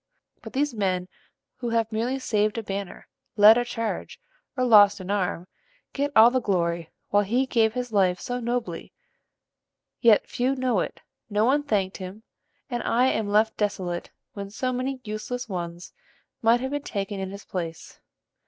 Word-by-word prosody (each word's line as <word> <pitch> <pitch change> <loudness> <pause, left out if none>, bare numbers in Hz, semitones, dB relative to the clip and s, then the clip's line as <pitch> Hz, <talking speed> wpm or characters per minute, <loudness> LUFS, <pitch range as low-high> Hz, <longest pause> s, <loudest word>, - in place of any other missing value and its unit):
But - - -10
these 290 0 0
men 185 -4 -1 0.5
who 245 -2 -3
have 230 -1 0
merely 235 +5 -1
saved 215 -4 0
a 230 - -2
banner, 200 -2 -6 0.3
led 210 +2 +9
a 245 - +2
charge, 230 -2 -4 0.4
or 255 - +1
lost 205 -3 +7
an 185 +1 -5
arm, 185 -3 -1 0.5
get 285 +1 -1
all 225 +2 +8
the 255 0 +1
glory, 170 -5 -1 0.2
while 205 - +4
he 240 +6 +1
gave 225 -3 +2
his 250 -1 -3
life 185 -4 +2
so 245 0 -3
nobly; 240 0 -3 1.1
yet 230 -4 +5
few 255 +2 0
know 255 -5 +1
it, - - -4 0.3
no 210 +1 +2
one 280 +4 +3
thanked 205 -9 -1
him, 190 +3 -8 0.4
and 240 -3 -3
I 250 +3 +2
am 220 -4 -1
left 215 +2 +2
desolate 185 -4 -2 0.2
when 200 -1 -6
so 255 +5 -2
many 255 +1 -3
useless 225 +4 -5
ones 175 -3 -6 0.5
might 235 +2 +4
have 265 +1 -3
been 290 0 -2
taken 200 -5 -4
in 190 -1 -3
his 200 +1 -9
place. 165 -3 -6
220 Hz, 170 wpm, -25 LUFS, 195-245 Hz, 1.1 s, led